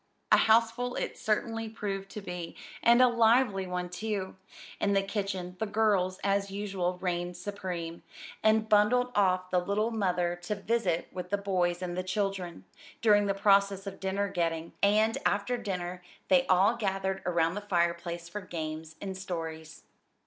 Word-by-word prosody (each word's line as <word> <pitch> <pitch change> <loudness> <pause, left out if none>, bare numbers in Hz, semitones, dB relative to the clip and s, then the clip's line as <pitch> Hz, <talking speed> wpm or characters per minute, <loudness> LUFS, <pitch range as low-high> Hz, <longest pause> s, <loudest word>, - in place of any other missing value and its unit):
A - - +8
houseful 230 +2 +3
it - - -3
certainly 225 +1 -1
proved 195 -3 -4
to 210 - -7
be, 180 -3 -6 0.3
and 240 +2 +6
a - - +7
lively 230 -4 +3
one, 180 0 -3
too. 195 +1 -4 0.4
In 200 - +1
the 195 0 +3
kitchen 195 -3 -3
"the 220 - -1
girls" 200 -4 +2
as 200 0 +1
usual 195 -3 -2
reigned 175 -1 -2
supreme, 180 -3 -5 0.4
and 220 0 +3
bundled 245 +4 +4
off 185 -2 +2
the 180 - +3
little 205 +5 0
mother 180 -5 0
to 190 +4 -2
"visit 200 -5 0
with 180 0 -6
the 205 - +1
boys 185 -3 0
and 175 -1 -3
the 185 - -1
children" 185 -2 -3 0.4
during 205 -2 +5
the 195 - 0
process 195 -1 +3
of 195 -1 -7
dinner 195 +1 -1
getting, 170 -3 -2
and 215 +2 +3
after 205 +5 +1
dinner 180 -5 -4 0.3
they 270 -1 +4
all 190 +5 +4
gathered 195 -3 -1
around 170 -1 +2
the 205 - -4
fireplace 170 -3 -1
for 205 +4 -6
games 160 -3 -6
and 190 -1 -4
stories. 165 -4 -6
195 Hz, 160 wpm, -29 LUFS, 180-210 Hz, 0.4 s, A